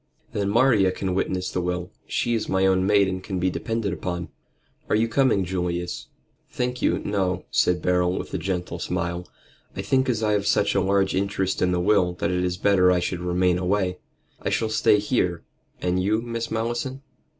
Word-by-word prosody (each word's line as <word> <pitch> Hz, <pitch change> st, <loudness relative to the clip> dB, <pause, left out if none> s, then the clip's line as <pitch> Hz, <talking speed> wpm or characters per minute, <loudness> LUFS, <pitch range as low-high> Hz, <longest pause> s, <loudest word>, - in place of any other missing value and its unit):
"Then 100 Hz, -1 st, -1 dB
Maria 110 Hz, -4 st, +4 dB
can 95 Hz, 0 st, -3 dB
witness 95 Hz, 0 st, -1 dB
the 90 Hz, -, -1 dB
will. 90 Hz, 0 st, -3 dB, 0.2 s
She 120 Hz, -, 0 dB
is 115 Hz, -, -1 dB
my 95 Hz, 0 st, +2 dB
own 95 Hz, 0 st, +3 dB
maid 100 Hz, -1 st, +4 dB
and 95 Hz, 0 st, -3 dB
can 95 Hz, -1 st, -4 dB
be 90 Hz, +1 st, +1 dB
depended 110 Hz, -1 st, -2 dB
upon. 90 Hz, +1 st, -4 dB, 0.6 s
Are -, -, +3 dB
you 110 Hz, +2 st, +2 dB
coming, 115 Hz, -6 st, +2 dB
Julius?" 90 Hz, -1 st, -3 dB, 0.4 s
"Thank 125 Hz, 0 st, -3 dB
you, -, -, +2 dB
no," 95 Hz, -3 st, -1 dB
said 90 Hz, 0 st, +2 dB
Beryl, 90 Hz, 0 st, +2 dB
with -, -, -6 dB
a -, -, -1 dB
gentle 90 Hz, -2 st, -3 dB
smile. 85 Hz, 0 st, -3 dB, 0.5 s
"I -, -, -4 dB
think 130 Hz, 0 st, +1 dB
as 115 Hz, -3 st, 0 dB
I 105 Hz, -, +2 dB
have 100 Hz, -1 st, +1 dB
such -, -, +2 dB
a 100 Hz, -, +2 dB
large 95 Hz, 0 st, +2 dB
interest 95 Hz, -1 st, -1 dB
in 90 Hz, -, +3 dB
the 90 Hz, -, +1 dB
will 90 Hz, -1 st, +3 dB
that 85 Hz, 0 st, -2 dB
it 90 Hz, 0 st, 0 dB
is 90 Hz, 0 st, -1 dB
better 90 Hz, -2 st, +4 dB
I 90 Hz, -, +3 dB
should 85 Hz, 0 st, -2 dB
remain 90 Hz, 0 st, +1 dB
away. 90 Hz, 0 st, 0 dB, 0.4 s
I -, -, -1 dB
shall 110 Hz, -, 0 dB
stay 110 Hz, -1 st, +4 dB
here. 100 Hz, -5 st, 0 dB, 0.4 s
And 90 Hz, +1 st, +1 dB
you, 105 Hz, +4 st, +1 dB
Miss 115 Hz, -1 st, -4 dB
Malleson?" 120 Hz, +4 st, -2 dB
95 Hz, 195 wpm, -24 LUFS, 90-105 Hz, 0.6 s, Maria